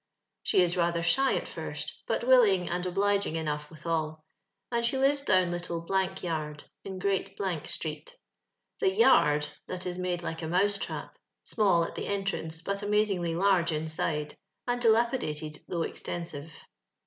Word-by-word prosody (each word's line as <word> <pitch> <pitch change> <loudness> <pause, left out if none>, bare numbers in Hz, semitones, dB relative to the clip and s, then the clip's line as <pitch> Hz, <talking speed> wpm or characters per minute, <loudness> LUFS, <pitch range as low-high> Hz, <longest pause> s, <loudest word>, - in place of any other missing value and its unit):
She 185 - +4
is 175 0 +1
rather 170 -1 +1
shy 265 +11 +3
at - - -2
first, - - -6
but - - 0
willing 220 -8 +5
and 180 +1 -1
obliging 200 -1 +1
enough 150 -2 -2
withal; 155 -1 -3 0.5
and 235 -1 +1
she 235 +3 +1
lives 275 +2 +3
down 185 -8 +3
Little 175 -1 -3 0.4
Yard, 155 -3 -3 0.2
in 190 -1 -6
Great 195 +1 -1 0.3
street. - - -4 0.6
The 395 - +3
yard*' 150 - +4 0.2
that 185 0 -5
is 180 0 -3
made 180 -1 -2
like 165 -1 -4
a - - -3
mousetn^ 195 +5 0 0.2
— - - -57
small 195 -6 +3
at - - -4
the - - -4
entrance, 195 -5 -2
but 200 +3 -2
amazingly 205 -5 +1
large 180 -2 +3
inside, 155 -1 -2 0.3
and 245 0 -1
dilapidated 220 - +1
though 170 -2 -1
extensive. 165 -3 -6
180 Hz, 150 wpm, -29 LUFS, 165-205 Hz, 0.6 s, willing